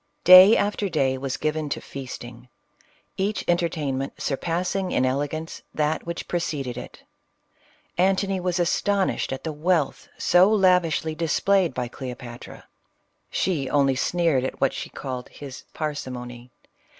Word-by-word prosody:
Day 185 +4 +10
after 205 -1 0
day 135 -5 +1
was 130 0 -3
given 155 -1 -2
to - - -2
feasting 125 -2 -9 0.3
— - - -35 0.3
each 200 +3 -1
enter 175 -1 +2
tainment 135 -4 -3
surpassing 180 +6 -2
in 130 - +2
elegance 145 +5 -3
that 155 +2 -1
which 170 - -5
preceded 145 -8 -2
it. 125 - -9 1.0
Antony 195 +1 +2
was 180 0 -1
astonished 195 +2 0
at 135 - -5
the 160 - -3
wealth 155 -1 0
so 185 +4 +5
lavishly 180 -6 +3
displayed 170 +1 +1
by 125 -1 -2
Cleopatra. 125 -1 -9 0.7
She 150 -8 -1
only 140 -1 +3
sneered 165 -1 +1
at 130 - -4
what 135 - +2
she - - -6
CLEOPATRA. - - -28
89 - - -8
called 125 0 -6
his 135 -3 -10
parsimony. 125 -5 -5
155 Hz, 140 wpm, -24 LUFS, 130-180 Hz, 1.0 s, Day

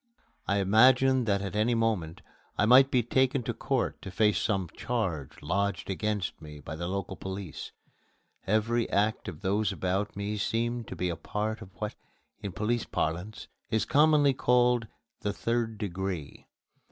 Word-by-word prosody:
I 100 - +2
imagined 125 +5 +5
that 100 -1 +1
at 100 +1 -4
any 110 +3 +2
moment 105 -8 -1 0.3
I 105 - +3
might 130 +4 +7
be 125 -3 +2
taken 130 +2 +2
to 120 - -2
court 130 +2 -1
to - - -7
face 105 +2 +2
some 95 -4 0
charge 90 - -3
lodged 100 +2 -1
against 105 -1 -2
me 75 -1 -10
by 75 +2 -7
the 85 +2 -4
local 95 0 -3
police. 95 -2 -6 0.8
Every 115 +3 +1
act 105 +2 +1
of 90 -2 -7
those 100 +1 +1
about 95 +2 -2
me 100 +1 -3
seemed 115 +2 -1
to - - -6
be 90 - -1
a 85 - -2
part 110 +4 -3
of - - -9
what, 105 +3 -4 0.5
in 100 -2 -4
police 110 +5 -1
parlance, 90 +7 -3 0.2
is 110 -1 +1
commonly 150 -1 +4
called 125 -2 +3 0.3
the 105 - -2
"Third 115 0 -1
Degree." 95 -6 -4
105 Hz, 160 wpm, -29 LUFS, 95-120 Hz, 0.8 s, might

